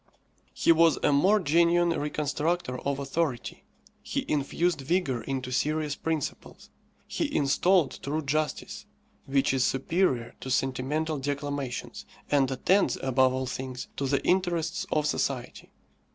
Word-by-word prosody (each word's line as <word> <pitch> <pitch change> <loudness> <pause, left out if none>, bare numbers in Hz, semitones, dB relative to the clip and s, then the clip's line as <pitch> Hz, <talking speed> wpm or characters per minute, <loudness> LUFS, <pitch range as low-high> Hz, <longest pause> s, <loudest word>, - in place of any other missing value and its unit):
He - - +4
was 165 -1 +5
a - - +4
more 190 +9 +4
genuine 170 +1 +3
reconstructor 150 -2 -1
of 140 +1 -2
authority. 140 -2 -3 0.4
He - - -3
infused 155 +2 0
vigour 135 -4 0
into 130 -2 -3
serious 150 +3 0
principles. 160 0 -4 0.4
He 295 - -2
installed 160 +4 +2
true 155 +3 -2
justice, 150 +2 -2 0.4
which 135 0 +2
is 130 -1 +2
superior 135 -3 0
to 130 - -7
sentimental 135 +5 -1
declamations, 145 -2 -4 0.3
and 140 -3 +3
attends, 185 +9 +2
above 130 0 +3
all 130 0 -2
things, 130 0 -5
to 140 - -1
the 140 +1 0
interests 175 -2 0
of 150 - +1
society. 135 -4 -2
145 Hz, 125 wpm, -27 LUFS, 135-165 Hz, 0.4 s, was